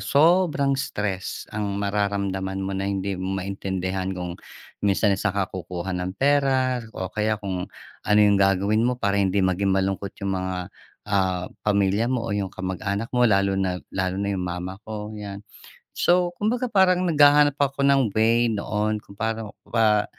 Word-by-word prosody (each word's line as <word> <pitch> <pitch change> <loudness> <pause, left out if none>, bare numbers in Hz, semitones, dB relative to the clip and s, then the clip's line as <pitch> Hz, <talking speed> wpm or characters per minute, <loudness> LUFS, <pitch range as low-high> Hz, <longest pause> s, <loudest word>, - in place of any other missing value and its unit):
sobrang 150 - +3
stress 95 -6 -3
ang 100 -2 -2
mararamdaman 100 -1 -1
mo 95 - -3
na 95 0 -2
hindi 100 0 -2
mo 95 +1 -2
maintindihan. 95 -1 -3
Kung 90 -1 -4 0.5
minsan 100 0 +2
sa'n 100 +2 0
ka 100 - +2
kukuha 90 0 -5
ng 90 +1 -3
pera. 135 -2 +2 0.2
O 95 -1 -4
kaya 110 0 0
kung 95 -3 -4 0.3
ano 105 0 +2
yung 100 -1 +4
gagawin 100 +2 +3
mo 125 +2 +1
para 100 -3 +1
hindi 95 0 +2
maging 95 +2 +1
malungkot 95 +1 -2
yung 95 -1 -1
mga, 95 0 -4 0.3
ah, 95 -3 0 0.2
pamilya 100 +2 +2
mo 125 -2 -1
o 110 - -2
yung 100 -2 -1
kamag-anak 100 +4 -4
mo, 125 -1 +4
lalo 100 -1 +3
na, 95 -2 0 0.2
lalo 95 -1 -1
na 100 +1 -1
yung 95 - -2
ma 90 -1 -3
ma 95 +2 -6
ko, 105 0 -5
'yan. 105 -1 -7 0.5
So, 175 0 +2
kumbaga, 240 +4 0
parang 185 -4 +3
naghahanap 145 -2 +5
ako 140 -1 +1
ng 135 -7 +3
way 115 +1 +3
noon 105 +1 -1
kung 100 - -16
pano, 110 -1 -3 0.2
ah, 110 -2 +3
100 Hz, 165 wpm, -24 LUFS, 95-115 Hz, 0.5 s, naghahanap